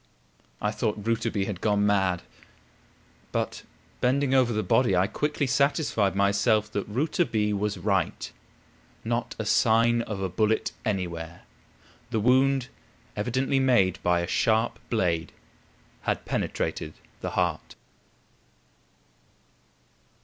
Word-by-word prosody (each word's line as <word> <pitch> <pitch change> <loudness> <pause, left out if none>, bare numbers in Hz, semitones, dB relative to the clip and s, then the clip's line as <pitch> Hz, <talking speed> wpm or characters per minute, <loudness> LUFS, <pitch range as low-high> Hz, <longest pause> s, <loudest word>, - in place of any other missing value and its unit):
I 105 - 0
thought 105 0 -1
Rouletabille 115 -3 0
had 100 -3 -5
gone 105 -1 +2
mad; 95 -3 +1 1.1
but, - - -2 0.4
bending 135 +2 +1
over 130 -2 +4
the 110 -1 -1
body, 105 +1 +3
I 90 +1 +3
quickly 150 +7 -1
satisfied 135 -7 +1
myself 100 +2 +2
that 100 - -3
Rouletabille 110 - 0
was 105 +1 -1
right. 100 -2 -1 0.7
Not 120 0 -2
a 110 - -3
sign 115 +2 +3
of 105 -4 -5
a 95 - -1
bullet 110 +4 0
anywhere 85 -4 -3 0.7
the 115 -2 0
wound, 130 +3 +3 0.5
evidently 130 +5 0
made 110 -9 +3
by 90 -1 +2
a 85 - -3
sharp 110 +5 +1
blade, 85 -8 0 0.7
had - - -2
penetrated 80 - -2 0.2
the - - -3
heart. - - -1
105 Hz, 115 wpm, -26 LUFS, 100-120 Hz, 1.1 s, over